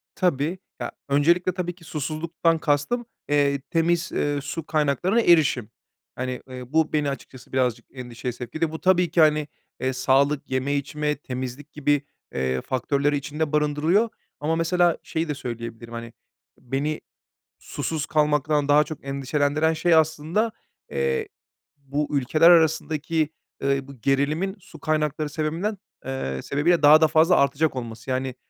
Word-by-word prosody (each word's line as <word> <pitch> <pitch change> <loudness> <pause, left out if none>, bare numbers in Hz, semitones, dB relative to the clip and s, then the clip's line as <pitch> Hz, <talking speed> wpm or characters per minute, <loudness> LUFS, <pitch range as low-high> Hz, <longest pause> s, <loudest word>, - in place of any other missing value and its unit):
Tabii. 170 -1 0 0.2
Ya, - - -4 0.2
öncelikle 170 +6 +3
tabii 175 -1 -3
ki 175 - -19
susuzluktan 160 +2 -1
kastım, 150 +12 0 0.2
eee, 140 -1 +2
temiz, 170 +1 +1
eee, 145 -1 0
su 155 +2 -5
kaynaklarına 160 +9 +1
erişim. 150 - +4 0.5
Hani, 130 0 -4
eee, 125 +2 -9
bu 160 -1 +2
beni 150 -2 +1
açıkçası 130 -2 -9
birazcık 125 -3 0
endişeye 125 -1 -5
sevk 120 +3 -9
etti. 160 0 0
Bu 160 - -7
tabii 180 -3 +3
ki, 170 - +4
hani, 150 -1 +4 0.3
eee, 130 0 -1
sağlık, 135 +2 +2
yeme 130 +2 0
içme, 150 +1 -1
temizlik 130 +1 -6
gibi, 145 -1 +1 0.3
eee, 65 -1 -1
faktörleri 140 +3 0
içinde 150 +2 -3
barındırıyor. 150 +9 +2 0.3
Ama 160 +3 0
mesela 175 +1 +2
şeyi 160 +1 -2
de 150 - -1
söyleyebilirim, 115 -1 -7
hani, 115 0 -7 0.4
beni 140 +5 -3 0.6
susuz 155 -3 -3
kalmaktan 150 -1 +1
daha 150 +1 +6
çok 150 -2 -9
endişelendiren 145 +3 +1
şey 170 +2 +2
aslında, 160 +8 +1 0.4
eee, 465 -3 -1 0.5
bu 140 +1 -3
ülkeler 155 +6 +5
arasındaki, 160 -1 +3 0.3
ııı, 140 0 0
bu 135 -5 -13
gerilimin 150 - +1
su 160 -3 -15
kaynakları 150 -1 -1
sebebinden, 165 +8 -2 0.3
eee, 100 - -3
sebebiyle 160 +4 +2
daha 150 +2 +8
da 160 - +6
fazla 160 +3 +4
artacak 140 +1 +2
olması. 115 0 -6
Yani, 130 0 -1
150 Hz, 145 wpm, -24 LUFS, 135-160 Hz, 0.6 s, daha